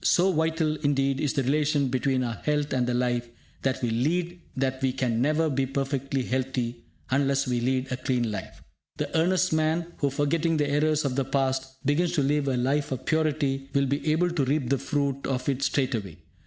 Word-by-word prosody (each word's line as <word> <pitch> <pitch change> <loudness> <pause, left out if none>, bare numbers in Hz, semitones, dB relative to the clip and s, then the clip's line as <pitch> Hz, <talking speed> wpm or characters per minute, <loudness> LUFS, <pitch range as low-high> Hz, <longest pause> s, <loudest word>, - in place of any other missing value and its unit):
So 185 +2 +4
vital 160 -1 +1
indeed 140 -2 +1
is 145 - 0
the 135 - 0
relation 145 0 +1
between 130 0 +1
our 120 -1 -2
health 150 -1 0
and 125 -2 +1
the 125 - 0
life 120 -1 0 0.3
that 130 -1 -1
we 120 - +1
lead 170 +9 0 0.2
that 130 0 -1
we 130 -1 +1
can 125 -3 0
never 155 +4 +2
be 135 -2 0
perfectly 135 0 -1
healthy 125 -2 -2 0.3
unless 140 0 +2
we 125 -1 0
lead 130 +2 0
a 130 - -1
clean 125 -3 0
life. 95 -3 -7 0.3
The - - -3
earnest 185 +2 +2
man 160 +2 0
who, 140 - +1
forgetting 155 +4 +1
the 145 -1 +1
errors 150 +1 +2
of 130 -2 -1
the 135 -1 0
past, 135 0 -1
begins 165 +5 +2
to 145 - +2
live 145 +1 +1
a 130 -2 +1
life 135 +4 0
of 130 0 -4
purity 145 -4 0
will 140 0 +4
be 140 +3 0
able 175 +3 +2
to 165 -5 0
reap 135 -1 0
the 140 -1 +2
fruit 140 -1 -1
of 125 -2 -2
it 135 -1 0
straightway. 125 - -1
135 Hz, 200 wpm, -26 LUFS, 130-150 Hz, 0.3 s, So